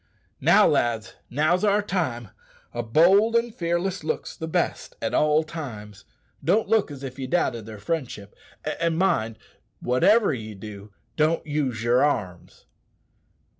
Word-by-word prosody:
"Now, -, -, +5 dB
lads, 115 Hz, -2 st, +1 dB, 0.2 s
now's 155 Hz, -, +1 dB
our 205 Hz, 0 st, +3 dB
time. 130 Hz, -, -2 dB, 0.4 s
A 120 Hz, -, -2 dB
bold 185 Hz, -, +4 dB
and 235 Hz, -1 st, +1 dB
fearless 175 Hz, +1 st, -2 dB
look's 155 Hz, -, -3 dB
the 160 Hz, -, -6 dB
best 160 Hz, -, -2 dB
at -, -, -3 dB
all 150 Hz, +1 st, +3 dB
times. 110 Hz, -, -8 dB, 0.4 s
Don't 220 Hz, +2 st, +2 dB
look 220 Hz, -3 st, +2 dB
as 140 Hz, -2 st, -9 dB
if 135 Hz, 0 st, -7 dB
ye 130 Hz, -, -4 dB
doubted 120 Hz, -8 st, 0 dB
their 110 Hz, -1 st, -8 dB
friendship; 105 Hz, -5 st, -4 dB, 0.4 s
and 165 Hz, -1 st, 0 dB
mind, 140 Hz, -, +1 dB, 0.4 s
wotever 195 Hz, -, +3 dB
ye 110 Hz, -4 st, -6 dB
do, 100 Hz, 0 st, -10 dB, 0.3 s
don't 155 Hz, +1 st, +2 dB
use 140 Hz, -7 st, -2 dB
yer 120 Hz, +2 st, +3 dB
arms. 95 Hz, -12 st, -2 dB
150 Hz, 140 wpm, -25 LUFS, 115-175 Hz, 0.4 s, Now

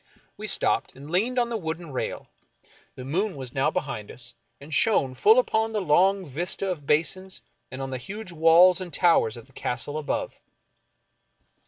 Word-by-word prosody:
We -, -, -7 dB
stopped, -, -, +1 dB
and 140 Hz, +3 st, -11 dB
leaned 225 Hz, +8 st, 0 dB
on 240 Hz, -1 st, +2 dB
the 235 Hz, -, -2 dB
wooden 165 Hz, -3 st, -5 dB
rail. 130 Hz, -, -4 dB, 0.7 s
The 130 Hz, -, -8 dB
moon 185 Hz, +8 st, -1 dB
was 130 Hz, -3 st, -6 dB
now 135 Hz, 0 st, +2 dB
behind 120 Hz, -7 st, -4 dB
us, 120 Hz, -1 st, -7 dB, 0.3 s
and 145 Hz, +2 st, -10 dB
shone 140 Hz, -9 st, +3 dB
full 215 Hz, -, +5 dB
upon 225 Hz, -3 st, +1 dB
the 215 Hz, -, 0 dB
long 190 Hz, +3 st, +3 dB
vista 175 Hz, +6 st, -2 dB
of 145 Hz, -6 st, -7 dB
basins 185 Hz, +5 st, -1 dB, 0.3 s
and 130 Hz, +1 st, -6 dB
on 135 Hz, -, -5 dB
the 130 Hz, -, -4 dB
huge 195 Hz, -, -8 dB
walls 170 Hz, +3 st, +5 dB
and 180 Hz, -2 st, -6 dB
towers 160 Hz, -11 st, +3 dB
of 115 Hz, -, -11 dB
the 135 Hz, -, -25 dB
Castle 140 Hz, +5 st, -3 dB
above. 150 Hz, -, -3 dB
165 Hz, 175 wpm, -25 LUFS, 135-190 Hz, 0.7 s, full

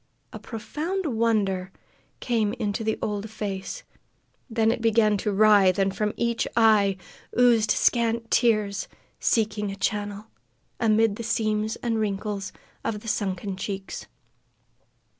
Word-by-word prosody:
A -, -, -7 dB
profound 310 Hz, -, -4 dB
wonder 215 Hz, -7 st, 0 dB, 0.5 s
came 220 Hz, -4 st, 0 dB
into 220 Hz, -2 st, -2 dB
the 220 Hz, 0 st, 0 dB
old 210 Hz, +1 st, -2 dB
face 205 Hz, -, -5 dB, 0.7 s
then 225 Hz, -1 st, +2 dB
it 235 Hz, -, -3 dB
began 220 Hz, -2 st, +3 dB
to 210 Hz, -, -1 dB
writhe, 200 Hz, -2 st, +5 dB
and 195 Hz, -1 st, +1 dB
from 210 Hz, -1 st, 0 dB
each 235 Hz, -1 st, 0 dB
eye 210 Hz, -4 st, +4 dB, 0.4 s
oozed 235 Hz, -3 st, +4 dB
scant 230 Hz, 0 st, +1 dB
tears, 215 Hz, -4 st, +2 dB, 0.3 s
seeking 210 Hz, -2 st, +1 dB
a 195 Hz, -, -5 dB
channel 205 Hz, +1 st, -2 dB, 0.5 s
amid 220 Hz, -2 st, +3 dB
the 230 Hz, -, -5 dB
seams 215 Hz, -1 st, 0 dB
and 230 Hz, -2 st, 0 dB
wrinkles 200 Hz, -1 st, -2 dB, 0.3 s
of 210 Hz, -2 st, -3 dB
the 225 Hz, -, -11 dB
sunken 195 Hz, -2 st, -2 dB
cheeks. 195 Hz, 0 st, -5 dB
215 Hz, 125 wpm, -25 LUFS, 200-230 Hz, 0.7 s, writhe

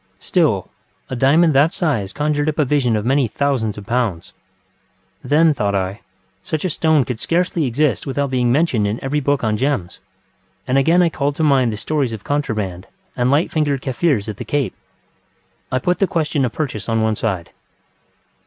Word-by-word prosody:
Still, 150 Hz, -, +1 dB, 0.4 s
a -, -, -1 dB
diamond 155 Hz, +6 st, +4 dB
that 145 Hz, +4 st, +4 dB
size 120 Hz, -, -1 dB
conjured 150 Hz, 0 st, 0 dB
up 155 Hz, -, -4 dB
a 150 Hz, -, +3 dB
vision 130 Hz, -4 st, +1 dB
of 105 Hz, 0 st, -2 dB
many 135 Hz, 0 st, +2 dB
thousands 115 Hz, -3 st, -1 dB
of 105 Hz, -, -8 dB
pounds. 115 Hz, -8 st, -2 dB, 0.9 s
Then, 155 Hz, +2 st, +4 dB
thought 105 Hz, -7 st, -1 dB
I, 95 Hz, +2 st, -2 dB, 0.4 s
such 155 Hz, +2 st, -3 dB
a 185 Hz, -, 0 dB
stone 155 Hz, -3 st, +2 dB
could 120 Hz, -2 st, -4 dB
scarcely 170 Hz, -2 st, 0 dB
exist 145 Hz, +4 st, 0 dB
without 140 Hz, 0 st, -1 dB
being 125 Hz, -2 st, +1 dB
mentioned 125 Hz, -7 st, +2 dB
in 105 Hz, +3 st, -2 dB
every 140 Hz, +3 st, 0 dB
book 145 Hz, -1 st, 0 dB
on 110 Hz, -1 st, +1 dB
gems, 130 Hz, -9 st, -2 dB, 0.7 s
and 130 Hz, +2 st, +3 dB
again 165 Hz, +6 st, +4 dB
I 170 Hz, -, +3 dB
called 145 Hz, -2 st, -2 dB
to 160 Hz, -, -1 dB
mind 135 Hz, -5 st, +3 dB
the 105 Hz, -, -5 dB
stories 140 Hz, 0 st, -1 dB
of 105 Hz, -4 st, -7 dB
contraband 110 Hz, -11 st, -2 dB, 0.3 s
and 125 Hz, 0 st, +1 dB
light 145 Hz, +5 st, +2 dB
fingered 145 Hz, -4 st, 0 dB
Kaffirs 130 Hz, -4 st, 0 dB
at 105 Hz, -2 st, -5 dB
the -, -, -5 dB
Cape. 145 Hz, -3 st, -1 dB, 1.0 s
I 130 Hz, -, +1 dB
put 180 Hz, +8 st, 0 dB
the 195 Hz, -, +3 dB
question 155 Hz, -5 st, 0 dB
of 120 Hz, -, -2 dB
purchase 120 Hz, -10 st, -4 dB
on 115 Hz, -1 st, +1 dB
one 110 Hz, -1 st, +1 dB
side. 95 Hz, -6 st, -3 dB
135 Hz, 185 wpm, -19 LUFS, 110-150 Hz, 1.0 s, diamond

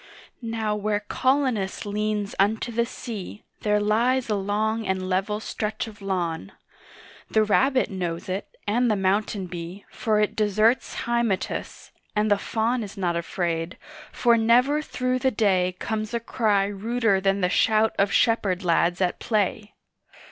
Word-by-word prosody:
Now 225 Hz, -2 st, -2 dB
where 210 Hz, 0 st, -1 dB
Colonos 255 Hz, -4 st, 0 dB
leans 210 Hz, 0 st, -2 dB
unto 215 Hz, +4 st, +1 dB
the 235 Hz, +1 st, 0 dB
sea 215 Hz, -4 st, -7 dB, 0.2 s
There 210 Hz, -1 st, +2 dB
lies 235 Hz, +4 st, +1 dB
a -, -, +2 dB
long 215 Hz, +2 st, -1 dB
and 190 Hz, -1 st, -1 dB
level 195 Hz, +3 st, 0 dB
stretch 215 Hz, 0 st, -3 dB
of 215 Hz, -2 st, -12 dB
lawn; 175 Hz, -, -2 dB, 0.8 s
The 220 Hz, -, +3 dB
rabbit 255 Hz, +5 st, +2 dB
knows 175 Hz, -3 st, -3 dB
it, 190 Hz, +2 st, -3 dB, 0.2 s
and 240 Hz, +4 st, +2 dB
the 215 Hz, -, +3 dB
mountain 195 Hz, 0 st, 0 dB
bee 175 Hz, +2 st, -7 dB
For 215 Hz, -2 st, 0 dB
it 210 Hz, -, +1 dB
deserts 215 Hz, +3 st, +2 dB
Hymettus, 235 Hz, -5 st, -2 dB, 0.2 s
and 210 Hz, 0 st, +1 dB
the 205 Hz, -, +4 dB
Faun 230 Hz, +4 st, 0 dB
Is 205 Hz, -1 st, -7 dB
not 175 Hz, -3 st, 0 dB
afraid, 170 Hz, 0 st, -2 dB, 0.3 s
for 235 Hz, -1 st, +3 dB
never 250 Hz, +6 st, +4 dB
through 255 Hz, -3 st, -1 dB
the 265 Hz, -, +2 dB
day 190 Hz, -6 st, +1 dB
Comes 215 Hz, +2 st, -3 dB
a -, -, +1 dB
cry 215 Hz, -4 st, +1 dB
ruder 205 Hz, 0 st, 0 dB
than 195 Hz, +1 st, +1 dB
the 180 Hz, -, +3 dB
shout 220 Hz, +3 st, +3 dB
of 200 Hz, 0 st, +3 dB
shepherd 205 Hz, -5 st, +2 dB
lads 175 Hz, +1 st, +2 dB
at 180 Hz, -1 st, 0 dB
play. 210 Hz, -1 st, -1 dB
210 Hz, 150 wpm, -25 LUFS, 195-225 Hz, 0.8 s, the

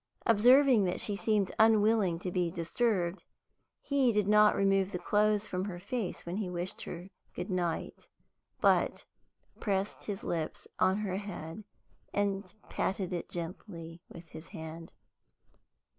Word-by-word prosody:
Observing 245 Hz, +1 st, +6 dB
that 180 Hz, -, -1 dB
she 205 Hz, -, -1 dB
seemed 205 Hz, -2 st, +1 dB
unwilling 215 Hz, -4 st, +4 dB
to 180 Hz, +1 st, -4 dB
be 175 Hz, -1 st, +1 dB
disturbed, 175 Hz, +1 st, -1 dB, 0.6 s
he 275 Hz, -4 st, +2 dB
did 210 Hz, -2 st, +1 dB
not 210 Hz, 0 st, +6 dB
remove 195 Hz, -1 st, +2 dB
the 180 Hz, -, -2 dB
clothes 210 Hz, +3 st, +2 dB
from 185 Hz, +1 st, -2 dB
her 190 Hz, -4 st, -5 dB
face 215 Hz, +2 st, -4 dB
when 175 Hz, +3 st, -3 dB
he 205 Hz, -4 st, -2 dB
wished 180 Hz, +1 st, -4 dB
her 175 Hz, +2 st, -7 dB, 0.3 s
goodnight, 180 Hz, -2 st, -3 dB, 0.5 s
but -, -, +2 dB, 0.5 s
pressed 200 Hz, -1 st, -2 dB
his 200 Hz, -2 st, -4 dB
lips 160 Hz, -2 st, -3 dB
on 190 Hz, +1 st, +3 dB
her 195 Hz, -3 st, -2 dB
head, 195 Hz, -2 st, -7 dB, 0.5 s
and 200 Hz, -1 st, -1 dB
patted 190 Hz, -1 st, -2 dB
it 175 Hz, -, -4 dB
gently 170 Hz, -1 st, -7 dB
with 170 Hz, 0 st, -12 dB
his 160 Hz, -, -10 dB
hand. 160 Hz, +1 st, -8 dB
195 Hz, 135 wpm, -31 LUFS, 175-210 Hz, 0.6 s, Observing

